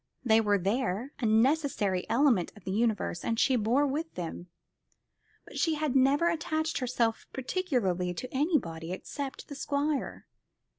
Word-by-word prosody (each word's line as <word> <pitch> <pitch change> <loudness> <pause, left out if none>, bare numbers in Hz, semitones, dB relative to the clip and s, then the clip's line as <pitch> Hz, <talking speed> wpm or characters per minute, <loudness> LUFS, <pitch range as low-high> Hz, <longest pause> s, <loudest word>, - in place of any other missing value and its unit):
They 225 -1 +5
were 205 -2 +2
there, 220 +5 -1
a 235 - 0
necessary 225 - +2
element 235 - +3
of 210 - -15
the 190 - -4
universe, 210 -5 0
and 230 -1 -1
she 265 - +3
bore 245 +5 +2
with 305 +4 -3
them. 175 0 -5 1.0
But - - -7
she 325 -2 +2
had 300 -3 -1
never 275 +5 +4
attached 315 -1 -1
herself 235 -3 -1
particularly 245 - -1
to 250 +8 -6
anybody 185 - 0
except 275 +8 -6
the 290 - -7
Squire. 285 +1 -2
250 Hz, 145 wpm, -29 LUFS, 205-285 Hz, 1.0 s, They